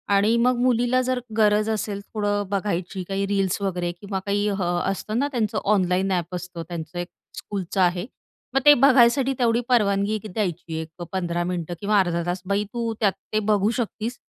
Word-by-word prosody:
आणि 210 +3 +3
मग 250 +2 +3
मुलीला 245 0 +3
जर 255 0 0 0.2
गरज 210 0 +3
असेल 210 -2 -2
थोडं 205 -1 0
बघायची 190 -2 -2
काही 195 0 0
रील्स 195 -1 0
वगैरे 180 -3 -1
किंवा 195 -1 -3
काही 205 +1 0
अ, 200 - -1 0.3
असतं 210 +3 -2
ना 280 - +1
त्यांचं 220 -4 -1 0.2
ऑनलाईन 185 0 +1
ॲप 180 -1 -1
असतं, 180 -1 -6
त्यांचं 170 0 -6
एक 175 - -3 0.3
स्कूलचं 195 -1 -3
आहे, 180 0 +2 0.5
मग 270 - +4
ते 295 - +10
बघायसाठी 270 0 +5
तेवढी 235 -1 +2
परवानगी 205 -3 +2
द्यायची 175 -5 -3
एक 160 - -8
अ, 175 - -4
15 175 -2 -1
मिनिटं 175 -1 -3
किंवा 205 0 +3
अर्धा 175 -2 +1
तास. 175 +1 -2
"बाई 200 +2 +1
तू 230 -1 -2
त्यात 200 -3 +3 0.2
ते 215 - +3
बघू 205 0 +3
शकतीस 230 +1 -3
200 Hz, 180 wpm, -24 LUFS, 180-220 Hz, 0.5 s, ते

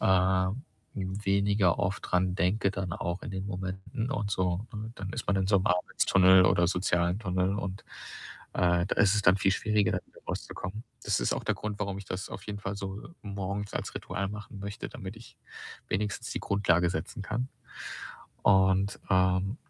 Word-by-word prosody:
äh, 95 +1 +3 0.4
weniger 100 -1 +2
oft 95 +2 0
dran 90 0 +2
denke 100 +2 +2
dann 95 -3 -3
auch 85 +1 -3
in - - -5
den 95 0 -4
Momenten 95 +6 -4
und 105 -6 -1
so, 95 +2 0
ne? 110 +2 -5
Dann 95 0 -5
ist 120 - -4
man 100 - +2
in 95 -1 +1
so 100 0 +4
'nem 95 - 0
Arbeitstunnel 95 +1 +5
oder 85 -1 +4
sozialen 90 +1 +1
Tunnel 95 -1 0
und, 95 -1 -4 0.7
äh, 85 -1 +3
da - - -1
ist 100 0 +5
es 105 - +1
dann 95 0 +6
viel 95 0 +3
schwieriger, 105 0 +1
wieder - - -19
rauszukommen. 105 +6 -5 0.2
Das - - +2
ist - - +1
auch - - -5
der - - +1
Grund, 105 -1 -4
warum 100 -1 -1
ich 100 - -8
das 90 +1 -4
auf 95 - -7
jeden 105 -1 -5
Fall 100 0 -3
so 100 +1 -5 0.2
morgens 100 0 -4
als - - -3
Ritual 100 -1 -3
machen 105 0 -8
möchte, 100 +1 -5
damit 95 +3 -8
ich 115 0 -14 0.5
wenigstens 105 +1 -2
die - - -3
Grundlage 90 -3 +2
setzen 95 - -4
kann. 120 +5 -2 0.9
Und, 95 0 +4
ähm, 95 +4 +3
95 Hz, 180 wpm, -29 LUFS, 95-100 Hz, 0.9 s, dann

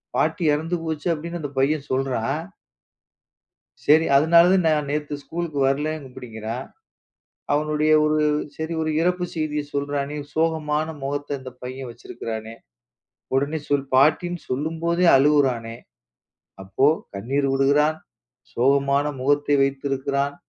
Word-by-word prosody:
பாட்டி 180 - 0
இறந்து 160 +4 -1
போச்சு 160 -1 -3
அப்படி 160 +1 -6
என்று 175 0 -5
அந்தப் 145 -2 -7
பையன் 145 +1 +1
சொல்கிறான். 135 +2 -1 1.4
சரி. 155 +2 +5
அதனாலதான் 170 +4 +5
நான் 150 -2 +1
நேத்து 150 0 -2
ஸ்கூல்க்கு 165 -3 -4
வரலை 145 +3 0
அப்படிங்கிறான். 125 -1 -7 0.9
அவனுடைய 150 +1 +1
ஒரு 155 0 +2 0.4
சரி 160 +1 -4
ஒரு 155 0 -1
இறப்புச் 180 0 0
செய்தியைச் 150 -2 -3
சொல்றானே. 140 0 -2 0.2
சோகமான 155 -1 0 0.2
முகத்த 145 +1 -3
இந்தப் 130 -1 -11
பையன் 130 0 -6
வச்சிருக்கிறானே! 115 -1 -7 0.8
உடனே 140 +4 +1
சொல் 140 -1 +1
பாட்டின் 155 +6 +3
சொல்லும்போதே 165 +6 0
அழுவுறானே. 130 -5 +2 0.9
அப்போ 95 +8 +1 0.3
கண்ணீர் 135 +8 -1
விடுகிறான். 145 +3 +3 0.6
சோகமான 140 +2 +2 0.2
முகத்த 145 +2 +1
வைத்திருக்கிறான். 140 +1 -1
145 Hz, 110 wpm, -23 LUFS, 135-155 Hz, 1.4 s, சரி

